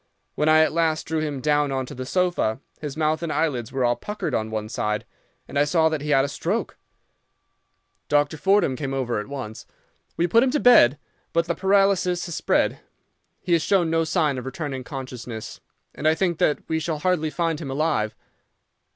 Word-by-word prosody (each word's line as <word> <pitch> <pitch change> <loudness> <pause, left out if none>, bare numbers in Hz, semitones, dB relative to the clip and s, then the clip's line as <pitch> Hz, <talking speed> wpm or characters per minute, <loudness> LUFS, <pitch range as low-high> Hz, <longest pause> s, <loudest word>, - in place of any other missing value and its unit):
When 150 - +1
I 155 0 +6
at 155 - +2
last 160 -1 +1
drew 160 0 -1
him 150 -4 -3
down 150 -1 +2
on 130 -1 -1
to - - -9
the 130 0 -6
sofa, 175 -9 0 0.2
his 150 -1 -6
mouth 155 0 +1
and 170 -2 -3
eyelids 130 -10 -1
were 130 -2 0
all 120 0 +2
puckered 210 - -5
on 110 0 -1
one 110 -1 -3
side, 105 -1 -2 0.4
and 140 - -2
I - - +5
saw 160 +2 +3
that 155 -2 -2
he 150 - -5
had 135 -2 +4
a - - -2
stroke. 140 - -2 1.3
Dr. 145 +1 +2
Fordham 190 -4 +2
came 135 0 -3
over 120 -4 -1
at 105 - -6
once. 130 -6 -7 0.5
We 170 - +2
put 225 +7 +4
him 265 - +3
to 295 +3 0
bed; 150 - +6 0.4
but 170 0 +2
the 170 - -1
paralysis 190 -2 +2
has 170 - -6
spread, - - +1 0.6
he 180 - -1
has 165 - +4
shown 175 -2 +2
no 165 0 +2
sign 155 -5 0
of 125 - -8
returning 135 -1 -4
consciousness, 125 -5 -7 0.3
and 155 - -2
I 155 - +4
think 175 -1 0
that 150 - +1
we 160 0 0
shall 160 0 -2
hardly 170 -1 0
find 165 -1 -1
him 140 - -5
alive. 135 -7 0
155 Hz, 200 wpm, -24 LUFS, 130-170 Hz, 1.3 s, I